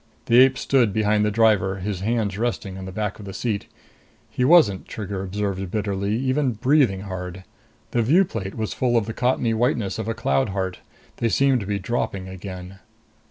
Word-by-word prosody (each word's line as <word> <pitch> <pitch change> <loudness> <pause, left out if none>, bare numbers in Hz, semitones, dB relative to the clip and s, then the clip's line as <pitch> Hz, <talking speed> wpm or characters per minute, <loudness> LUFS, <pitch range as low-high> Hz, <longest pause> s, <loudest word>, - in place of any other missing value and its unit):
The 120 +1 +5
ape 130 0 +6
stood 125 -6 +2
behind 105 0 +2
the 105 - +2
driver, 105 -3 +3
his 95 0 -3
hands 105 -1 -1
resting 110 -3 -2
on 95 0 -7
the 95 - -7
back 105 +1 -3
of 105 - -9
the 95 - -8
seat. 110 -4 -2 0.6
He 125 - -1
wasn't, 125 - +5
Trigger 100 -3 -5
observed 95 -1 -3
bitterly, 100 0 -1
even 130 +1 0
breathing 125 -4 +2
hard. 95 -1 -6 0.5
The 120 - +1
view 165 - +4
plate 100 - -5
was 110 -2 -3
full 120 -2 +1
of 115 - +1
the 110 - -5
cottony 125 -1 +1
whiteness 110 -4 0
of 110 - -4
a 115 - -2
cloud 70 -7 +1
heart. 95 -1 -3 0.4
They 115 - 0
seemed 135 +1 +3
to 100 - -6
be 100 -1 0
dropping 100 -2 -3
again. 95 0 -8
105 Hz, 190 wpm, -23 LUFS, 95-120 Hz, 0.6 s, ape